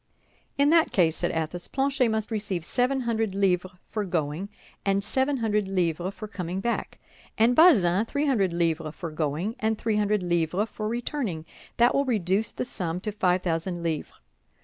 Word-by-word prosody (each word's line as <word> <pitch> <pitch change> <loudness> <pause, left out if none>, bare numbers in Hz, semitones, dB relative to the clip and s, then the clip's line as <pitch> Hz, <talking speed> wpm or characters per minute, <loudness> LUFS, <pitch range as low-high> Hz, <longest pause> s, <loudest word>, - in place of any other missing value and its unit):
"In 285 +2 +4
that 330 -1 +4
case," 165 -4 +3
said - - 0
Athos, 165 +2 -3
"Planchet 270 -2 +1
must 220 0 -1
receive 200 -6 -2
seven 255 +5 +1
hundred 225 -4 -1
livres 185 -2 +1
for 215 - -2
going, 170 0 -2 0.3
and 195 0 +1
seven 265 +6 0
hundred 210 -4 0
livres 180 0 -1
for 215 - -7
coming 185 -3 -4
back; 235 +4 -2 0.4
and 235 +3 +4
Bazin, 210 - +6
three 285 +4 -1
hundred 210 -10 +2
livres 165 -2 -1
for 170 -3 -6
going, 155 +8 -2
and 220 0 0
three 220 -1 0
hundred 210 -2 +1
livres 175 +4 0
for 215 - -4
returning—that 235 - -1
will 280 - +2
reduce 210 -3 +1
the - - -4
sum 180 -7 -3
to 210 - -3
five 185 -3 +1
thousand 170 +1 -2
livres. 160 -3 -2
200 Hz, 170 wpm, -26 LUFS, 175-230 Hz, 0.4 s, Bazin